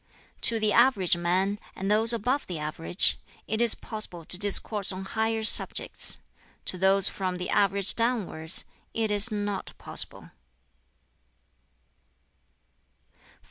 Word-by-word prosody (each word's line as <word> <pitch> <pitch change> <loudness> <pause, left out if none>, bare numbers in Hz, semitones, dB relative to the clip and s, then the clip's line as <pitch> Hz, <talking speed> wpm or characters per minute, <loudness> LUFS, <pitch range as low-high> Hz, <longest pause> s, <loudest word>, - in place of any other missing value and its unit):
"To 230 -1 +1
the 215 -1 0
average 230 -8 +3
man, 185 +4 -1 0.2
and 195 +2 -4
those 220 +2 +6
above 245 +5 -1
the 180 - -6
average, 155 +4 0 0.3
it 220 +2 -2
is 235 -2 +6
possible 180 -6 -6
to - - -7
discourse 205 +1 +2
on 190 +1 -7
higher 220 +2 -2
subjects; 220 - +3 0.4
to 185 - -4
those 195 +1 +3
from 185 -2 -3
the 180 - -6
average 200 -1 +1
downwards, 210 -9 -1 0.3
it 220 -2 -1
is 210 +3 +4
not 205 -2 -5
possible." - - 0
200 Hz, 120 wpm, -26 LUFS, 185-220 Hz, 0.4 s, those